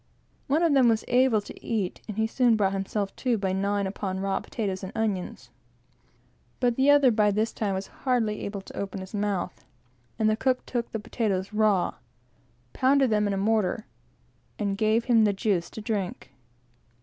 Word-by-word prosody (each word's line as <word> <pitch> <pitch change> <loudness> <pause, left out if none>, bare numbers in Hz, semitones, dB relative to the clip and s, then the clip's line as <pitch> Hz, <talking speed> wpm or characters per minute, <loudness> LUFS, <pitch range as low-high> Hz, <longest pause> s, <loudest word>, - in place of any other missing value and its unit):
One 305 +5 +2
of 330 -3 +3
them 260 -4 +5
was 220 -1 +1
able 245 -3 +3
to - - -12
eat, 205 -6 -2
and 210 -2 -6
he 220 - +2
soon 235 0 +3
brought 195 -2 +1
himself 195 +1 -2
to, 245 -3 +1
by 190 -2 -1
gnawing 200 +1 0
upon 190 -1 -3
raw 195 0 0
potatoes; 195 -4 -4 1.8
but 245 -2 +2
the 265 +3 +3
other, 285 -3 +6
by 210 -2 +3
this 215 +3 0
time, 200 -3 -1
was 190 +1 -3 0.2
hardly 235 -5 0
able 200 -1 -4
to - - -13
open 195 0 -4
his 190 +2 -10
mouth; 200 -6 -2 0.5
and 220 - +2
the 215 - +3
cook 255 +2 0
took 240 -2 -3
the 220 - -3
potatoes 205 -2 -2
raw, 210 -4 +2 0.8
pounded 265 -1 +3
them 210 -1 +2
in 200 - 0
a - - -1
mortar, 215 +1 +1 0.7
and 200 -2 -1
gave 220 +2 +2
him 230 -3 +4
the 205 -1 +3
juice 195 -3 0
to 220 - -8
drink. 205 -4 -3
215 Hz, 175 wpm, -26 LUFS, 195-235 Hz, 1.8 s, other